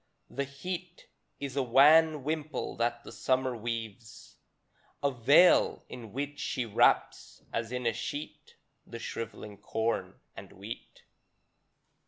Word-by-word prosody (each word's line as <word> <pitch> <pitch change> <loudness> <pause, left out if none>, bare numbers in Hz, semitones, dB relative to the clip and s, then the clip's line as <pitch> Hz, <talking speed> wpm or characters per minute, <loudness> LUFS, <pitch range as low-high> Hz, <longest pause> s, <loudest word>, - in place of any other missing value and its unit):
The 140 +1 -2
heat 175 +5 -7 0.3
Is 140 -2 -5
a 140 - +2
wan 150 +4 +6
wimple 155 +1 -3
that 120 0 -1
the - - -10
Summer 130 -1 0
weaves, 115 0 -6 0.7
A 140 - +3
veil, 140 +8 +5
in 115 -4 -9
which 145 +4 -4
she 125 - -2
wraps, 110 - +1
as 115 0 -2
in 125 -1 -3
a 115 - +2
sheet, 145 +6 -6 0.3
The 115 - -7
shriveling 110 -3 -6
corn 110 +2 -2 0.2
and - - -11
wheat. 100 +5 -9
125 Hz, 125 wpm, -30 LUFS, 115-145 Hz, 0.7 s, wan